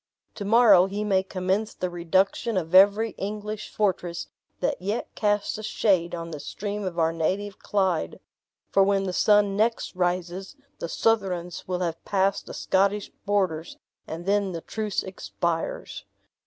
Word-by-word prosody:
To 205 - -6
morrow 205 -4 +6
he 205 +2 -3
may 195 -3 +2
commence 190 +3 -2
the 180 -1 -3
reduction 190 +6 +1
of 165 -2 -3
every 205 +4 +6
English 210 +1 -4
fortress 180 -4 -1 0.3
that - - -1
yet 205 +5 -3
casts 205 0 0
a - - -5
shade 185 -5 +1
on 165 0 -6
the 150 - -6
stream 205 +7 -5
of 180 -2 -4
our 165 -1 +2
native 190 +5 -2
Clyde; 185 - 0 0.5
for 195 - +4
when 195 0 +3
the 185 -1 -3
sun 205 0 +4
next 220 -1 0
rises, 180 +4 -2 0.2
the 170 - -4
Southrons 185 -6 0
will 180 0 -2
have 165 -2 -3
passed 195 0 0
the - - -7
Scottish 200 +2 +1 0.2
borders 185 -6 0 0.3
and 165 +2 -6
then 200 -1 +1
the 165 - -4
truce 215 +1 -2
expires." 170 -3 -3
195 Hz, 155 wpm, -26 LUFS, 175-205 Hz, 0.5 s, morrow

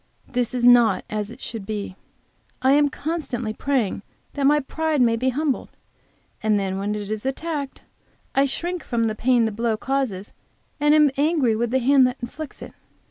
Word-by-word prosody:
This 245 0 -1
is 245 -1 +1
not 240 -5 +5
as 210 -1 -2
it 240 +3 -12
should 225 -3 -6
be. 205 -2 -5 0.7
I 260 - +5
am 290 +1 +4
constantly 275 -8 -3
praying 245 -6 -1 0.3
that 280 -2 +1
my 295 +1 +4
pride 315 +2 -1
may 235 -2 +4
be 255 +3 0
humbled, 280 +1 -1 0.7
and 215 -1 +2
then 190 -1 -2
when 205 +2 -2
it 205 0 -5
is 215 -1 -3
attacked, 280 +1 -4 0.5
I 275 - +4
shrink 345 +5 -2
from 235 -2 -1
the 220 -1 0
pain 240 +1 +2
the 220 - -1
blow 225 +1 -1
causes, 250 -7 -2 0.5
and 295 +1 +4
am 300 -2 +5
angry 285 -6 +2
with 235 +1 -1
the 260 - +1
hand 265 +1 +5
that 250 +1 -4
inflicts 280 +5 -7
it. - - -10
250 Hz, 185 wpm, -23 LUFS, 220-285 Hz, 0.7 s, not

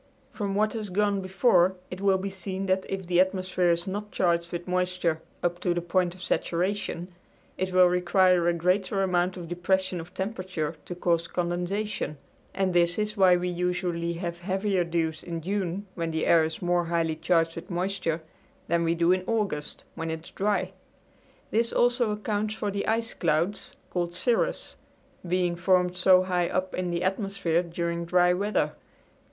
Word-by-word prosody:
From 200 -2 -2
what 215 +1 +2
has 215 -3 -4
gone 200 +1 +1
before 185 -1 +3 0.2
it 180 +1 -6
will 195 -1 +4
be 195 +1 -4
seen 190 0 -4
that 190 0 0
if 190 -1 -3
the 175 0 +2
atmosphere 185 -1 +2
is 170 +1 +1
not 205 +2 -4
charged 170 -1 +1
with 175 0 -5
moisture 180 -3 0 0.2
up 175 0 0
to 175 -1 0
the 175 - 0
point 175 0 +1
of 185 - -11
saturation 180 0 -1 0.4
it 185 0 -2
will 185 0 +6
require 180 0 +3
a 175 - +3
greater 185 +3 +1
amount 180 0 +1
of 175 -2 -7
depression 185 +1 0
of 165 +2 -9
temperature 185 -6 -3
to 175 - -6
cause 170 -1 +1
condensation, 175 0 -2 0.3
and 190 -2 0
this 175 0 +3
is 210 0 -1
why 185 -3 +6
we 180 +1 -2
usually 175 -1 -1
have 170 0 -4
heavier 190 +1 0
dews 165 -2 -1
in 170 -1 -5
June 190 +2 -2
when 165 -2 -3
the 160 0 -1
air 165 -1 +5
is 160 +2 -4
more 175 0 +2
highly 165 -1 0
charged 165 0 +1
with 165 - -8
moisture 175 -3 -2 0.4
than 170 0 +2
we 165 0 +1
do 170 +1 +3
in 185 0 +2
August 205 -10 -2
when 165 0 -4
it 160 0 -4
is - - -13
dry. 195 -2 0 0.8
This 230 +2 +1
also 245 -1 +2
accounts 210 0 -2
for 210 -2 -2
the 200 0 -3
ice 225 +1 0
clouds, 170 +4 -1 0.2
called 175 -1 -2
cirrus, 230 +6 0 0.5
being 175 0 +1
formed 180 0 +2
so 185 0 +5
high 180 -2 0
up 185 0 -1
in 180 -1 -2
the 175 0 -1
atmosphere 195 -3 0
during 170 0 -3
dry 180 +1 +4
weather. 200 +3 0
180 Hz, 175 wpm, -27 LUFS, 170-195 Hz, 0.8 s, will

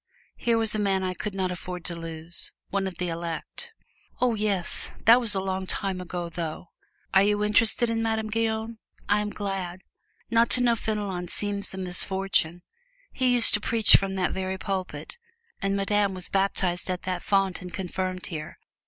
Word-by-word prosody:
Here 235 -1 +1
was 225 -1 +2
a 215 - +2
man 195 -2 +1
I 185 -1 -1
could 200 +2 -5
not 185 -1 -1
afford 180 -1 -6
to 170 - -3
lose 165 0 -5 0.2
one 195 -1 0
of 180 -3 -7
the 180 -1 -2
elect! 170 - -5 0.5
"Oh, 250 -2 +2
yes; 205 -4 0
that 230 +2 +8
was 230 -5 +2
a - - +1
long 190 0 -3
time 190 -1 -2
ago, 175 -1 -4
though. 165 0 -6 0.4
Are 190 - +7
you 205 +1 +2
interested 220 +3 +5
in 225 0 -1
Madame 220 -1 -1
Guyon? 225 0 -1 0.3
I 205 +1 +3
am 210 0 -2
glad 195 -3 -4 0.5
not 230 0 +4
to 250 - +3
know 235 -1 +4
Fenelon 205 -5 -3
seems 200 +1 0
a - - -8
misfortune. 185 -2 +1 0.5
He 255 -1 +2
used 235 -2 +6
to 210 - +3
preach 225 -2 +5
from 195 -1 +2
that 185 -1 0
very 190 0 -3
pulpit, 190 - -5 0.4
and 195 0 0
Madame 200 0 +1
was 185 -1 0
baptized 190 -2 +1
at 180 -1 -2
that 180 -1 -2
font 195 -2 +1
and 180 0 -8
confirmed 185 0 -3
here. 155 -2 -6
195 Hz, 180 wpm, -26 LUFS, 180-215 Hz, 0.5 s, that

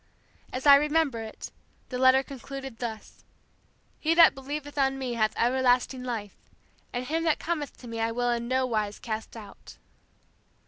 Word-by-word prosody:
As 255 +2 -5
I 280 -1 +10
remember 300 -4 +1
it, 220 -1 -8 0.4
the 250 - -4
letter 260 +1 +5
concluded 270 -2 -8
thus: 225 -3 -7 0.8
'He 320 +1 +1
that 335 -1 +8
believeth 290 +2 -6
on 270 -1 +1
Me 255 -2 -3
hath 220 -2 +1
everlasting 250 +1 +2
life, 225 -5 -6 0.4
and 245 +1 -3
him 325 +4 -1
that 320 - +3
cometh 310 -4 -4
to 245 - -12
Me 230 -1 -5
I 225 0 0
will 245 +1 0
in 235 0 -2
no 260 +1 +1
wise 215 -4 -2
cast 220 0 -6
out!'" 205 -3 -12
255 Hz, 165 wpm, -27 LUFS, 230-280 Hz, 0.8 s, I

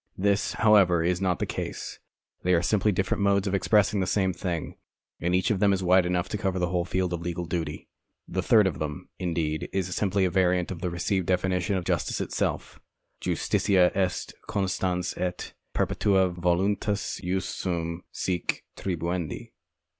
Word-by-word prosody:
This, 100 +1 +1
however, 100 -7 +5
is 90 +2 0
not 90 -2 +1
the - - -1
case. - - -5 0.4
They 90 0 +3
are 85 - +1
simply 105 +2 +2
different 95 +1 0
modes 100 0 +3
of 100 - -1
expressing 100 +1 +3
the 95 - 0
same 95 -1 +1
thing, 85 -2 -4 0.4
and 90 +2 +1
each 95 +3 +2
of 100 - 0
them 100 0 +4
is 95 -1 -1
wide 90 0 +4
enough 90 +1 0
to 105 - -3
cover 95 -3 -1
the 90 -1 0
whole 90 -1 0
field 90 0 -1
of 85 - -3
legal 85 0 -3
duty. 80 -2 -4 0.4
The 95 - -1
third 105 +2 +5
of 95 - -1
them, 75 -2 -5
indeed, 80 -3 -2
is 90 -2 -2
simply 100 -1 +1
a 90 - 0
variant 90 -1 +2
of 85 -3 -6
the 90 - -1
received 90 +2 -1
definition 90 +1 +1
of 90 - -4
justice - - 0
itself: - - -2 0.4
Justitia 90 -3 +2
est 95 -2 -1 0.2
constans 90 -2 -1
et 90 -1 -3 0.2
perjoetua 95 -2 +2
voluntas 95 +4 0
jus 90 0 -1
suum 85 -2 -3
cuique 90 -3 -2
tribuendi. 85 -2 -3
90 Hz, 170 wpm, -27 LUFS, 85-95 Hz, 0.4 s, however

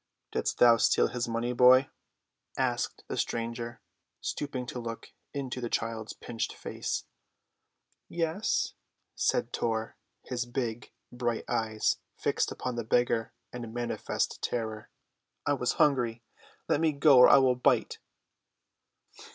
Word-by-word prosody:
"Didst - - -1
thou 120 -1 +7
steal - - +3
his 120 -1 -2
money, 115 +1 -1
boy?" 130 +2 +6 0.7
asked - - -1
the - - -3
stranger, 115 0 -3 0.4
stooping 135 -4 -3
to 125 - -5
look 115 -1 -7 0.2
into 130 -3 -4
the 120 - -3
child's 115 -1 -2
pinched 115 -2 -4
face. - - -4 1.0
"Yes," 170 +4 0 0.4
said - - 0
Tor, 110 -1 -1 0.3
his 125 -1 -3
big, 120 -2 -3 0.2
bright 120 -2 -2
eyes 110 -1 0 0.2
fixed - - 0
upon 125 -2 -4
the 120 - -1
beggar 115 0 +1 0.2
in 120 -2 -6
manifest 120 +1 -2
terror. 110 -2 -3 0.6
"I - - +2
was - - 0
hungry. 120 -5 +2 0.4
Let 145 - +2
me 160 -2 +3
go 140 -2 +6
or 125 - +9
I - - +8
will 130 -2 +5
bite." 125 - +1
120 Hz, 125 wpm, -29 LUFS, 115-125 Hz, 1.0 s, or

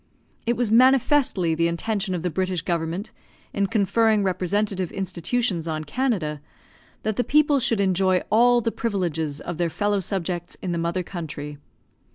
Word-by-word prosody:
It 235 - +1
was 240 -3 0
manifestly 255 - +4
the 165 +1 +2
intention 190 +3 -1
of 170 - -4
the 180 - -1
British 185 -1 -1
government, 170 +4 -2 0.4
in 200 -1 +1
conferring 220 0 +2
representative 190 0 -1
institutions 190 -1 -1
on 155 -1 -2
Canada, 155 - -1 0.6
that 215 -1 -1
the 245 - +2
people 295 0 +3
should 230 -3 +1
enjoy 185 -1 +2
all 240 +2 +5
the 230 - -1
privileges 165 -11 -2
of 175 -1 -6
their 170 -1 +1
fellow 205 +4 0
subjects 175 -2 -4
in 185 - -4
the 170 - -1
mother 170 +2 -1
country. 150 -5 -7
190 Hz, 155 wpm, -24 LUFS, 170-225 Hz, 0.6 s, all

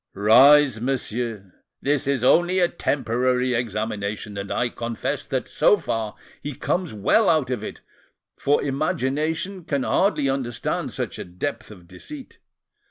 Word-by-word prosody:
"Rise, 130 +4 +6
monsieur. 115 -6 -3 0.3
This 140 0 +1
is 140 -3 0
only 175 +7 +4
a 180 -2 +4
preliminary 125 -3 0
examination, 105 -2 -3
and 100 0 -5
I 120 - 0
confess 115 -1 -4
that, - - -2
so - - +3
far, 110 -2 -3 0.3
he 145 -1 -5
comes 180 +4 -1
well 110 - +3
out 155 -6 +2
of 125 - -2
it, - - -7 0.5
for 145 +1 +1
imagination 155 +5 -1
can 140 -4 -1
hardly 185 -5 +2
understand 130 -4 -2
such - - -4
a - - -4
depth 110 +7 -5
of 90 -5 -14
deceit. 285 - -11
130 Hz, 140 wpm, -23 LUFS, 110-150 Hz, 0.5 s, Rise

